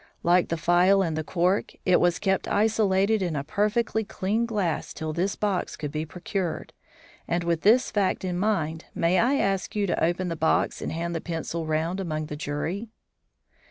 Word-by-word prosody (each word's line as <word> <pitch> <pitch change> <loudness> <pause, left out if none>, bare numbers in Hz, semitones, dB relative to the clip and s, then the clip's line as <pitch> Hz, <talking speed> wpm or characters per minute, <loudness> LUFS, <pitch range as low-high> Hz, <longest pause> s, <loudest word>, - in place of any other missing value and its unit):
Like 175 +1 +3
the 165 - -1
phial 180 +4 +4
and 165 -3 -1
the 155 - -2
cork, 180 +4 0
it 185 -1 +5
was 175 -1 +2
kept 195 -2 0
isolated 210 -1 +2
in 175 -4 -1
a 140 - -2
perfectly 215 +6 0
clean 215 +3 -1
glass 200 -8 -2
till 155 -1 -4
this 185 +5 -1
box 200 -3 -1
could 150 -2 -5
be 155 +1 -3
procured, 180 +1 -4 0.5
and, 170 0 0
with 170 -1 0
this 235 +5 +4
fact 195 -2 0
in 180 -1 -2
mind, 165 -6 -1
may 170 +2 +2
I 260 +4 +3
ask 195 -6 0
you 205 -1 +1
to 185 - 0
open 175 +2 +1
the 165 - -2
box 160 0 +1
and - - -3
hand 170 +1 -3
the 165 - -3
pencil 165 -1 -4
round 160 +4 -1
among 155 -4 -3
the 150 - -6
jury?" 155 +9 -3
180 Hz, 190 wpm, -26 LUFS, 165-200 Hz, 0.5 s, it